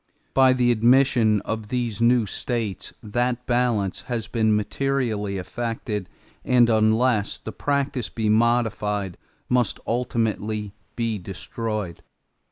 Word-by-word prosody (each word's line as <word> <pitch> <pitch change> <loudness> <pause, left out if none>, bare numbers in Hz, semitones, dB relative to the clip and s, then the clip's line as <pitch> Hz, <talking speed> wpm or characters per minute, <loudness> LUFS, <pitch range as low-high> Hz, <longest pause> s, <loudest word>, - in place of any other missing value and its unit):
By 130 -1 +5
the 125 -1 +3
admission 120 -2 +4
of 110 -1 -4
these 120 -3 -2
[new] 120 -1 +4
states 110 -1 -3
that 120 +3 -1
balance 120 -6 0
has 115 -4 -2
been 110 -1 +1
materially 105 -2 -1
affected 110 -1 -4 0.3
and 120 -2 +4
unless 110 0 +2
the 110 - -7
practice 140 -4 -1
be 110 -2 -2
modified 105 -4 +1 0.3
must 125 -3 +1
ultimately 110 -3 -1 0.2
be 115 -3 -1
destroyed. 100 0 -5
115 Hz, 110 wpm, -24 LUFS, 105-125 Hz, 0.3 s, By